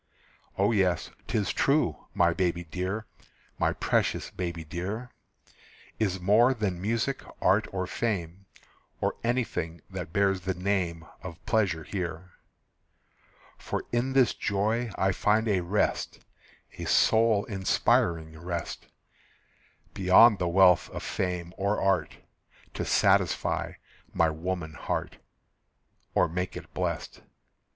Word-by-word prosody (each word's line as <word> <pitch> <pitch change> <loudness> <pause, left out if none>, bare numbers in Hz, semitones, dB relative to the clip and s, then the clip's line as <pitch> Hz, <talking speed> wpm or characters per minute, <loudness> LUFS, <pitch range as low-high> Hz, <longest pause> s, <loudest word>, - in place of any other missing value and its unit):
O 100 +3 +3
yes, 95 -5 +1 0.2
'tis 105 -3 0
true, 140 - +1
my 85 0 +4
baby 85 -1 0
dear, 95 +6 -4 0.5
My - - +2
precious - - 0
baby 85 -2 -4
dear, 100 +10 -5 0.9
Is 95 -4 0
more 110 +8 +4
than 95 -6 -2
music, 115 +6 -1 0.2
art, 105 +3 +3
or 95 -1 -2
fame, 95 -3 -3 0.5
Or - - 0
anything 115 -9 -1
that 90 -4 -6
bears 95 -1 +2
the 95 +1 -2
name 90 -3 -1 0.2
Of 85 -4 -9
pleasure 95 -7 +1
here. 90 -1 -5 1.3
For - - -3
in 120 +3 0
this 130 -4 +4
joy 110 +4 0
I 95 0 +2
find 105 +4 +2
a 100 -3 +2
rest, 95 +4 0 0.6
A - - -4
soul 110 -2 +4
inspiring 85 -5 +1
rest, 85 0 -5 1.1
Beyond 100 +4 +6
the 90 - 0
wealth 90 0 +5
of - - -7
fame 90 -2 -3
or 100 +2 0
art, 95 0 +1 0.6
To - - -3
satisfy - - +2 0.4
my 80 -1 +2
woman 80 0 -4
heart, - - -4 1.0
Or - - +4
make 90 +2 -3
it - - -11
blest. - - -3
95 Hz, 120 wpm, -28 LUFS, 85-105 Hz, 1.3 s, Beyond